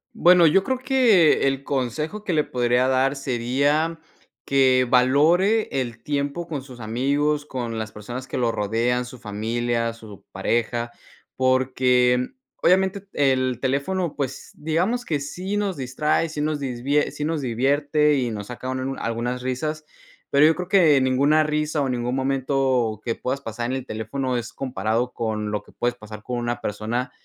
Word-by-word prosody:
Bueno, 175 -1 +6
yo 175 +5 +4
creo 260 +4 -1
que, 245 - +4
el 135 0 -1
consejo 150 - -3
que 185 - -1
le 150 -2 +3
podría 125 0 +1
dar 130 +1 +2
sería, 140 +5 0 0.5
que 130 -2 +4
valore 155 - +3
el 120 -2 -6
tiempo 145 +4 -2
con 145 -4 -4
sus 130 -2 -12
amigos, 140 +6 0
con 120 -3 -4
las 110 0 -5
personas 120 +5 -7
que - - -4
lo 120 -2 +1
rodean, 115 +4 0
su 125 +1 -10
familia, 115 +2 -2
su 110 -3 -13
pareja. 120 +4 -1 0.4
Porque, 125 -1 +2 0.3
obviamente, 190 +2 +2
el 130 -3 +1
teléfono, 145 +6 -1
pues, 135 -2 -4
digamos 180 +11 -1
que 155 -10 -1
sí 180 +8 -4
nos 200 -3 -1
distrae, 145 +5 0
sí 150 -1 -4
nos 150 0 -1
disvie 135 +2 0
sí 150 - -5
nos 160 -1 -1
divierte 145 +5 +2
y 125 -3 0
nos 105 -2 -6
sacan 130 +1 -5
una 135 - -5
algunas 120 +2 -2
risas. 150 +5 -3 0.5
Pero 140 +2 +5
yo 160 - +6
creo 180 0 -5
que 165 -8 +5
ninguna 140 +4 +3
risa 150 0 -1
o 135 - 0
ningún 125 0 -2
momento 130 -4 0
que 115 - -2
puedas 135 +2 -3
pasar 120 -2 -5
en 130 - -2
el 130 - -7
teléfono 125 +4 -3
es 120 -1 -5
comparado 120 -1 -1
con 110 -2 -3
lo 105 -1 -2
que - - -19
puedes 120 0 -1
pasar 105 -2 -10
con 125 +2 -4
una 120 0 -2
persona 110 +5 -3
130 Hz, 165 wpm, -23 LUFS, 120-150 Hz, 0.5 s, Bueno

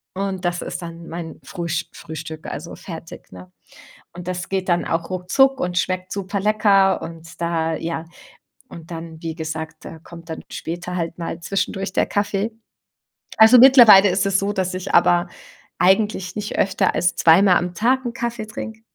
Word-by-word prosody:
Und 190 -2 -3
das 175 0 -1
ist - - -5
dann 170 0 -9
mein 165 -1 -7
Frühsch 170 -3 -3
Frühstück, 160 0 -8
also 170 - -7
fertig, 165 -3 -10
ne? 90 0 -12 0.6
Und 175 +1 -10
das 180 -1 -4
geht 190 -1 -2
dann 175 0 +2
auch 165 +1 -2
ruckzuck 265 +10 +2
und 180 0 -2
schmeckt 185 +1 -1
super 200 0 -3
lecker 200 -2 +3
und 165 +1 -10
da, 165 -1 0
ja 165 0 -4 0.7
und 165 0 -12
dann, 165 -1 -8
wie 165 -1 -5
gesagt, 160 0 -6
äh, 160 - -9
kommt 170 -1 -13
dann - - -7
später 175 +2 -5
halt 170 -1 -3
mal 165 0 -5
zwischendurch 195 +1 -2
der - - +1
Kaffee. 205 +2 -1 0.9
Also, 225 +3 +8
mittlerweile 235 -7 +8
ist 185 +1 +1
es 195 -1 +2
so, 200 +1 -1
dass 185 -2 -2
ich 185 +1 -5
aber 175 0 +4 0.5
eigentlich 190 -1 +2
nicht 210 -1 -4
öfter 190 0 +1
als 180 - +1
2 165 +3 +5
mal 185 -3 +5
am 175 0 -3
Tag 255 +4 +1
'n 235 - -3
Kaffee 235 -2 -4
trinke. 220 +1 -8
180 Hz, 175 wpm, -21 LUFS, 165-200 Hz, 0.9 s, Also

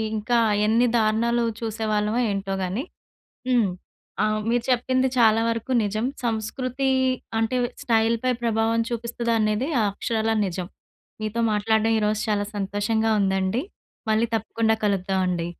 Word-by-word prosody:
ఇంకా 220 +3 0 0.3
ఎన్ని 230 +3 +3
దారుణాలు 230 +2 +2 0.2
చూసేవాళ్ళమో 215 0 -1
ఏంటో 195 -1 -2
గానీ. 190 +8 -2 0.7
హ్మ్. 240 -5 +3 0.6
ఆహ్, 215 0 +1
మీరు 235 0 +1
చెప్పింది 255 +1 +2
చాలా 225 -1 +5
వరకు 230 +2 -2
నిజం. 215 +2 -2 0.2
సంస్కృతి 245 +4 -2 0.5
అంటే 225 +3 0 0.3
స్టైల్‌పై 230 0 +2
ప్రభావం 225 0 +1
చూపిస్తదా 235 0 -2
అనేది 215 +5 0 0.2
అక్షరాల 220 +2 -1
నిజం. 180 -1 -4 0.5
మీతో 215 +2 -2
మాట్లాడడం 220 +1 +2
ఈరోజు 210 0 0
చాలా 205 -1 0
సంతోషంగా 205 +3 0
ఉందండి. 190 +5 0 0.5
మళ్ళీ 220 +2 +3
తప్పకుండా 225 0 +1
కలుద్దామండి. 185 -3 0
220 Hz, 115 wpm, -24 LUFS, 210-235 Hz, 0.7 s, చాలా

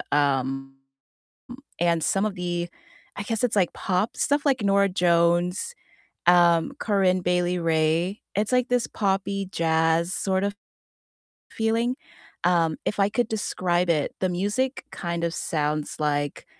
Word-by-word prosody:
m 135 -1 0 1.1
and 170 -1 +2
some 195 +2 +1
of 215 - -2
the 175 -1 -3 0.5
I 200 - -3
guess 225 0 -2
it's 230 -3 0
like 185 -4 +2
pop 190 +4 -1
stuff 285 +1 +1
like 260 -5 +2
Norah 200 0 +3
Jones, 175 - +1 0.5
um, 170 +2 +5
Corinne 190 -3 +2
Bailey 180 0 +1
Rae, 165 +4 +1
it's 210 +4 0
like 250 0 +2
this 245 -2 +1
poppy 195 -1 -1
jazz 165 +1 +1
sort 190 -1 0
of 200 0 -1 1.0
feeling, 230 +3 0 0.5
um, 165 -3 +2
if 210 - -2
I 195 0 +3
could 240 +2 0
describe 180 -5 -1
it, 150 -4 0
the 185 - +1
music 205 +9 -1
kind 170 -1 -4
of 165 - -2
sounds 150 -2 -2
like 145 -1 -1
180 Hz, 135 wpm, -25 LUFS, 165-205 Hz, 1.1 s, um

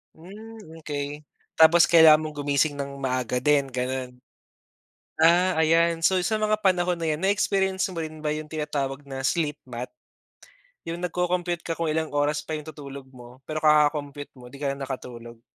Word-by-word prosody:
Hmm, 210 +7 -12 0.2
okey. 145 0 -5 0.3
Tapos 165 +1 +6
kailangan 160 -2 +7
mong 155 -1 -7
gumising 145 +1 +1
ng 140 -1 -6
maaga 130 -2 -2
din 140 +1 +2
gano'n? 125 0 -4 1.0
Ah, 175 +3 +5
ayan. 165 +1 +3
So 190 +3 +3
sa 215 +3 0
mga 215 0 +2
panahon 180 -2 +2
na 165 - -5
'yan, 150 - -4
na 190 - +1
experience 190 -2 +1
mo 170 - -5
rin 155 -1 -7
ba 150 - 0
'yung 155 0 -5
tinatawag 145 -3 -3
na 135 -1 -7
sleep 150 +1 -1
math? 125 +1 -6 0.9
'Yung 170 +1 -5
nagko-compute 180 0 -2
ka 165 - -2
kung 165 -1 -2
ilang 155 -1 -2
oras 145 +1 0
pa 160 - -5
'yung 155 0 -5
tutulog 140 -3 -10
mo, 125 0 -15
pero 155 - -3
kaka-compute 150 -2 +2
mo 125 0 -14
'di 140 - -12
ka 140 - 0
na 140 - -5
nakatulog. 120 -3 -8
150 Hz, 175 wpm, -25 LUFS, 140-170 Hz, 1.0 s, kailangan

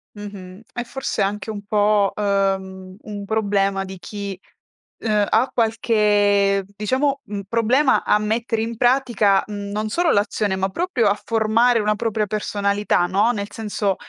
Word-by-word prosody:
Mh-mh. 200 -1 -9
È 240 - -3
forse 265 -2 -4
anche 205 +2 -2
un 205 -2 -6
po', 205 -1 +2
uhm, 190 -2 -1
un 205 -1 -7
problema 200 -2 0
di 190 -1 -9
chi, 200 -1 -6 0.6
uhm, 210 -2 +1
ha 235 +4 +2
qualche 205 -3 +2
diciamo, 265 +7 0
un 200 -1 -5
problema 240 +6 +2
a 210 - +3
mettere 225 +1 -1
in 230 0 -4
pratica, 240 -5 +3
mhmm, 205 -1 -6
non 215 +1 -2
solo 335 +7 +1
l'azione, 205 -1 0
ma 190 +1 -1
proprio 270 - 0
a 205 +1 +1
formare 230 +2 +2
una 210 0 +1
propria 215 -1 -1
personalità, 205 -2 0
no, 205 +6 +2
nel 205 -3 -4
senso, 205 -3 -2
210 Hz, 150 wpm, -21 LUFS, 200-225 Hz, 0.6 s, a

